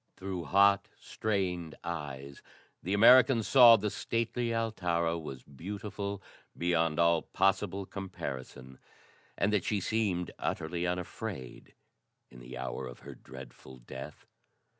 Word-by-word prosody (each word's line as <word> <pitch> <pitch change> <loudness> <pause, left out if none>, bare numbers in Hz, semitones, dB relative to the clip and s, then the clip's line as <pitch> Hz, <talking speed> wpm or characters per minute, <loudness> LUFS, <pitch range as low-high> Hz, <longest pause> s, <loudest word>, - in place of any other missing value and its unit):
Through 95 -3 -5
hot, 100 +4 +4
strained 90 -6 -2
eyes 70 -5 -6 0.4
the 95 +4 -1
American 125 +2 +7
saw 120 -1 +8
that 110 - -2
the 105 - 0
stately 115 +1 -2
Altara 90 -8 0
was 70 -5 -8
beautiful 100 +6 -6 0.3
beyond 85 -2 +1
all 85 -1 +4
possible 95 0 0
comparison, 65 -9 -7 0.6
and 105 +1 +1
that 100 -4 +2
she 105 - 0
seemed 95 -4 -1
utterly 85 +2 -2
unafraid 90 - -6 0.6
in 60 - -13
the 65 +1 -9
hour 65 0 -4
of - - -11
her - - -9
dreadful 65 0 -12
death. 65 +4 -10
90 Hz, 120 wpm, -31 LUFS, 75-100 Hz, 0.6 s, saw